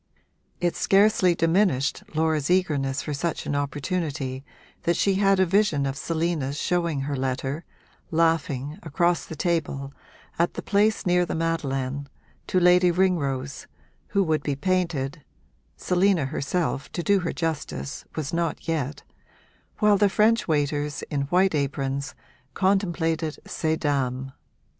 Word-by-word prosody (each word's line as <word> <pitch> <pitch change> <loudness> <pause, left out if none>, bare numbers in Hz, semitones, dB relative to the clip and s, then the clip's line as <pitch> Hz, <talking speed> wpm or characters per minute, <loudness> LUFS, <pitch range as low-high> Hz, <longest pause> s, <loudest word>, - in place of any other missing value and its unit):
It 175 -1 0
scarcely 195 -3 +4
diminished 165 -5 +2
Laura's 155 -2 +1
eagerness 145 -7 +1
for 150 - -3
such 160 +3 -2
an 145 - -1
opportunity 145 -2 -2 0.4
that 170 - +1
she 200 - +3
had 195 0 +3
a 190 - +5
vision 180 -6 +2
of 135 0 -2
Selina's 160 -3 -1
showing 170 -4 0
her 140 +1 -2
letter, 135 +4 -2 0.4
laughing, 155 -2 0
across 170 +2 +1
the 160 - -7
table, 145 -4 -1 0.5
at 170 - +1
the - - -5
place 210 +2 +2
near 180 0 +3
the 175 - -3
Madeleine, 140 -4 -2 0.4
to 185 - +2
Lady 180 0 +5
Ringrose 145 -7 0 0.4
(who 200 - +2
would 155 -4 +1
be 145 -1 -2
painted 160 -5 -1 0.5
Selina 180 -3 +2
herself, 145 +1 -2
to 175 - -2
do 200 +1 +3
her 175 -2 -2
justice, 155 - -4
was 155 -1 -3
not 170 0 -2
yet) 145 -3 -2 0.7
while 210 -2 +4
the 205 -1 +5
French 220 +3 +3
waiters, 145 -1 0
in 140 -2 -1
white 185 +2 +3
aprons, 140 -1 -2 0.4
contemplated 170 -5 0
ces 160 0 -1
dames. 135 -3 -1
160 Hz, 135 wpm, -25 LUFS, 140-180 Hz, 0.7 s, a